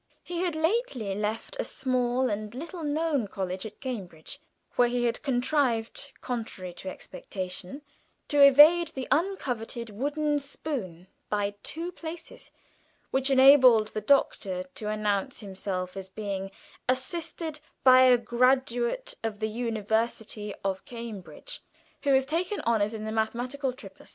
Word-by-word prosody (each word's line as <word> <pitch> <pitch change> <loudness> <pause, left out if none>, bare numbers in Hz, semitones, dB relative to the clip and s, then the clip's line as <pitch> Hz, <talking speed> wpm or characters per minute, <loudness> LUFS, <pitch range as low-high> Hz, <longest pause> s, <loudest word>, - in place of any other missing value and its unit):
He 345 -1 -4
had 355 -3 0
lately 315 - 0
left 210 - -3
a - - +2
small 255 - 0
and 210 +2 -4
little 330 +5 -6
known 295 -5 0
college 190 0 -4
at 210 - -14
Cambridge, 205 - -6 0.4
where 245 - +5
he 245 0 0
had 235 0 0
contrived, 255 -1 0
contrary 220 -7 -4
to 185 - -6
expectation, 185 +7 -6 0.4
to 290 -2 +3
evade 300 +5 +8
the 265 -4 -6
uncoveted 250 - -1
wooden 295 +6 0
spoon 255 - -5 0.2
by 205 -1 0
just 205 0 -30
two 335 +3 -4
places, 330 -1 -9 0.6
which 265 +1 +1
enabled 260 -5 +7
the 215 - -4
Doctor 200 -7 +2
to 210 - -5
announce 210 +3 -1
himself 190 -2 -4
as 190 -1 -6
being 195 -1 -4 0.4
"assisted 310 +4 -2 0.2
by 255 -1 +8
a 255 -1 +7
graduate 245 - +1
of 220 -2 -2
the 215 +1 -1
University 220 -1 -1
of 190 -1 -1
Cambridge 235 - -7 0.4
who 285 - +2
has 265 0 +3
taken 340 +7 -1
honours 220 -1 +1
in 215 0 -5
the 220 - -3
Mathematical 245 +5 -1
Tripos." 200 -7 -13
240 Hz, 135 wpm, -28 LUFS, 210-285 Hz, 0.6 s, evade